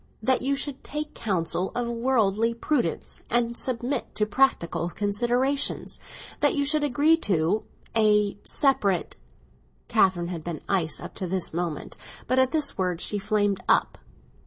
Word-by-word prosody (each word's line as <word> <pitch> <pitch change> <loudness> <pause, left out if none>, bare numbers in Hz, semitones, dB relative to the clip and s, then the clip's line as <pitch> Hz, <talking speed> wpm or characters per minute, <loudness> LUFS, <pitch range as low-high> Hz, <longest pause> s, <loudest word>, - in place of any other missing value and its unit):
"That 260 +3 +2
you 275 +2 +1
should 275 -1 -4
take 300 +1 -4
counsel 185 -2 -1
of 245 -1 -1
worldly 230 -2 +1
prudence, 235 - -2
and 235 0 +1
submit 250 +1 -1
to 210 - +1
practical 205 -8 +1
considerations. 240 +9 0 0.4
That - - +3
you 285 -1 +1
should 300 +1 +2
agree 290 +4 +3
to—a—separate." 210 - 0 0.7
Catherine 175 -2 +2
had 170 -3 -5
been 170 -2 -5
ice 175 -5 0
up - - -8
to 185 - -2
this 180 -2 -1
moment, 170 -3 -4 0.3
but 255 - +2
at 260 0 +3
this 305 -9 0
word 180 -2 0
she 205 +3 0
flamed 205 -1 0
up. - - +2
220 Hz, 135 wpm, -26 LUFS, 190-265 Hz, 0.7 s, That